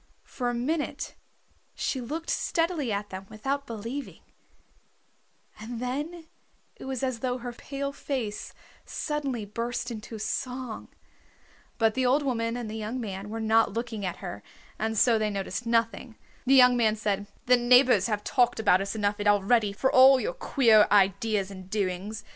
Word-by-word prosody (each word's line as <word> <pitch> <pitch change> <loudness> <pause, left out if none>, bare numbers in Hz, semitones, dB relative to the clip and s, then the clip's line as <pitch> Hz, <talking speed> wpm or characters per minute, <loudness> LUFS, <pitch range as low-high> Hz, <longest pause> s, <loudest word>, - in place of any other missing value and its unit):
For 245 -2 -3
a 245 - -2
minute 295 +6 -2 0.6
she 260 - -2
looked 315 +7 -4
steadily 330 -7 0
at 205 0 -3
them 190 +1 -7
without 270 +6 -3
believing, 230 +5 -6 1.4
and 225 +2 -6
then 295 +7 -4 0.5
it - - -11
was 265 -1 -4
as 255 -3 -1
though 250 +1 -1
her 245 0 -6
pale 280 +3 -5
face 245 -8 -4 0.3
suddenly 275 -7 -3
burst 235 +3 -4
into 220 0 -7
song. 250 +2 -4 0.9
But 225 -1 +3
the 255 +2 +1
old 280 +4 +3
woman 230 -3 -1
and 240 -2 -5
the 215 - -6
young 220 +3 -4
man 200 -3 -5
were 225 +1 -4
not 220 -1 +3
looking 230 -2 -4
at 180 -2 -3
her 100 - -6 0.4
and 220 0 -1
so 230 0 +4
they 215 0 0
noticed 195 +2 -4
nothing. 230 0 0 0.3
The 270 - +6
young 250 -1 +7
man 220 -3 +2
said, 205 -2 -2 0.2
"The 250 - +6
neighbors 245 -4 +5
have 210 -2 -2
talked 245 -4 +2
about 195 -4 +4
us 200 +3 -3
enough 205 -1 0
already 205 +1 +3
for 260 +7 0
all 260 +1 +7
your - - -2
queer 230 - +4
ideas 200 0 +2
and 185 -1 -10
doings. 200 +1 -3
230 Hz, 160 wpm, -27 LUFS, 210-255 Hz, 1.4 s, young